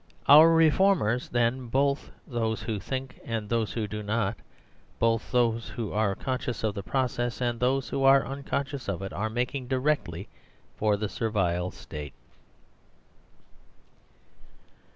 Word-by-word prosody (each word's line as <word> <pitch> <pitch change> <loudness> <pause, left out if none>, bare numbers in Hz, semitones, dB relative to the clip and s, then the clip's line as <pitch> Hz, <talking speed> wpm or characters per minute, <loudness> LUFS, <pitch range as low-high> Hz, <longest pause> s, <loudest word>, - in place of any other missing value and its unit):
Ourreformers, 160 - +5
then, 120 +1 0
both 140 +3 0 0.2
thosewhothinkand 115 0 -3
those 115 -2 0
who 110 -3 -2
do 105 +1 -5
not, 105 0 -1 0.6
both 115 -1 +1
those 115 -2 +1
who 115 -4 -5
are 105 -2 +1
conscious 125 -1 -3
of 110 -2 0
the 100 - -5
pro 130 +7 0
r 130 - +1
cess 120 -3 -3
and 120 -2 -1
those 130 0 +1
who 135 - -1
are 135 0 +6
unconscious 140 -1 -4
of 95 -1 -3
it, 95 - -6
are 110 +2 -2
making 125 +3 -2
directly 130 - -1 0.5
for 105 -1 +1
the 105 +1 -2
Servile 95 -5 -1
State. 75 -5 -8
115 Hz, 130 wpm, -27 LUFS, 105-135 Hz, 0.6 s, are